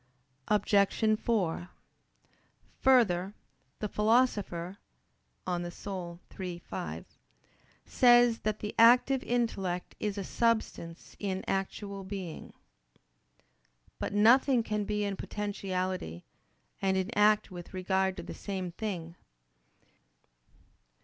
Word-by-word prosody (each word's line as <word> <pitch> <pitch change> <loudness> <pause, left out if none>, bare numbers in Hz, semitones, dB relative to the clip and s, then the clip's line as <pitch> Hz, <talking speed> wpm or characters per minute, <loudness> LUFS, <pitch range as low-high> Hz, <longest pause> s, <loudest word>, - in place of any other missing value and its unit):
Obj. 210 +1 +2
4: 185 -7 -1 1.1
Further, 205 -7 +3 0.4
the 210 - -3
Philosopher 205 -5 +1 0.7
(De 185 - -2
Anima 175 0 -5 0.2
iii, 180 -2 -4
5) 175 - -6 0.8
says 240 -2 +5
that 215 0 -2
the 210 - -4
active 250 +3 +6
intellect 195 -8 -2
is 210 -1 -2
a 200 - -2
"substance 220 -7 -1
in 190 -2 -2
actual 195 +1 -3
being." 190 -4 -7 1.5
But - - -3
nothing 240 +4 +5
can 210 -1 -2
be 210 0 -1
in 200 -1 -2
potentiality 185 - -3 0.6
and 190 -1 +2
in 190 +5 -2
act 210 0 +4
with 175 -1 -9
regard 190 0 0
to - - -6
the - - -7
same 190 -3 -4
thing. 175 -4 -5
200 Hz, 100 wpm, -30 LUFS, 185-215 Hz, 1.5 s, active